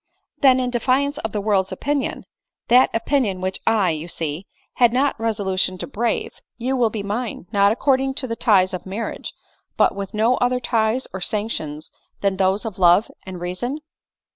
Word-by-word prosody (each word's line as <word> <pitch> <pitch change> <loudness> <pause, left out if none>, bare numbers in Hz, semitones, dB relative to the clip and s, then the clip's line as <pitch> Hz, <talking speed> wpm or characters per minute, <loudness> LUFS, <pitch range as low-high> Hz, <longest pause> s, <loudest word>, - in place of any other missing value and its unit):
" - - -46
Then, 260 -2 +6
in 250 -1 -1
defiance 270 +4 +1
of 220 - -4
the 210 - -2
world's 200 -2 +1
opinion, 280 +8 -2 0.4
that 250 +2 +6
opin 275 +4 +1
ion 195 -5 -2
which 185 +1 -3
I, 210 -6 +3
you 155 +1 -4
see, 165 +1 -4 0.3
had 240 -2 +5
not 270 +3 +2
resolution 195 -4 0
to - - -5
brave, 235 -3 -2 0.2
you 255 +3 -1
will 240 -3 +3
be 215 -2 -4
mine 215 0 -4
— - - -38
not 200 0 +4
according 265 +2 +1
to 270 - -2
the 230 -2 -3
ties 195 -6 +3
of 185 - -5
marriage, 205 +4 -4 0.5
but - - +4
with 195 +1 -6
no 230 +4 +3
other 250 0 +1
ties 230 +1 0
or 190 - -5
sanction 180 -8 -3 0.4
than 195 -1 +1
those 190 +3 +1
of 210 -3 -6
love 180 +4 +5 0.2
and 185 -1 -6
rea 175 +1 -3
son 245 +10 -3
220 Hz, 190 wpm, -22 LUFS, 190-250 Hz, 0.5 s, Then